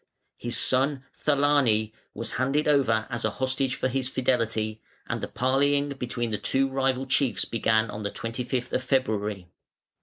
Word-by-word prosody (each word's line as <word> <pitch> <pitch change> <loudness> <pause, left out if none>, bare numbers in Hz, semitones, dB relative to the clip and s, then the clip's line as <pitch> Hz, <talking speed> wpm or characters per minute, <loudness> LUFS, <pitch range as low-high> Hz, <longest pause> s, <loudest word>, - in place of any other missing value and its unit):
His 120 0 -2
son 135 +1 +2
Thelane 140 -7 +2 0.2
was 115 +1 -3
handed 135 +4 +1
over 125 -7 +3
as 120 -1 -3
a 110 - +2
hostage 130 0 0
for - - 0
his 130 0 -1
fidelity, 110 -4 0 0.2
and - - -3
the - - -3
parleying 140 +3 +1
between 125 -4 -3
the 105 - -2
two 135 0 +1
rival 135 -1 0
chiefs 130 -6 +1
began 110 -1 +1
on 105 - -6
the 100 - -2
25th 125 +3 -4
of - - +1
February. 105 -8 -1
130 Hz, 155 wpm, -26 LUFS, 110-135 Hz, 0.2 s, over